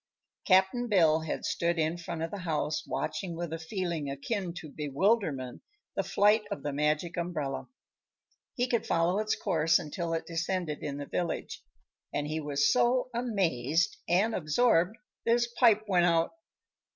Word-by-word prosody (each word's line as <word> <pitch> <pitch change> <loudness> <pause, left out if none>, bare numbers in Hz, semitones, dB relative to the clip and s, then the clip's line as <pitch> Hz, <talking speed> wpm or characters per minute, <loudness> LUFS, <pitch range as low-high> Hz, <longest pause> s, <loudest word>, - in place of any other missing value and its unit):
Cap'n 190 +6 +4
Bill 165 -6 +4
had 160 -1 -4
stood 170 0 0
in 160 +1 +1
front 170 -1 -5
of 165 - -3
the 205 - -5
house, 155 -3 -2
watching 180 -4 -3
with 170 -1 -4
a 165 - -4
feeling 170 -4 -3
akin 175 +7 -3
to 170 - -7
bewilderment 150 - 0 0.3
the - - +1
flight 205 +3 +3
of 200 - -5
the 145 - -2
Magic 150 +4 0
Umbrella. 155 -6 -3 0.9
He 245 -2 +1
could 235 -2 0
follow 170 +4 +2
its 215 0 0
course 160 0 +2
until 165 +2 -3
it 165 - -3
descended 170 -1 -2
in 145 -2 -4
the 145 - -5
village 175 +3 -3 0.5
and 145 - -2
he 155 +1 -2
was 145 -1 +2
so 250 +1 +2
amazed 180 - 0
and 200 +6 +3
absorbed 180 +3 +2 0.3
that 230 - +5
his 240 0 +3
pipe 230 -3 +4
went 180 -3 +4
out. 165 -1 +2
170 Hz, 160 wpm, -30 LUFS, 155-200 Hz, 0.9 s, that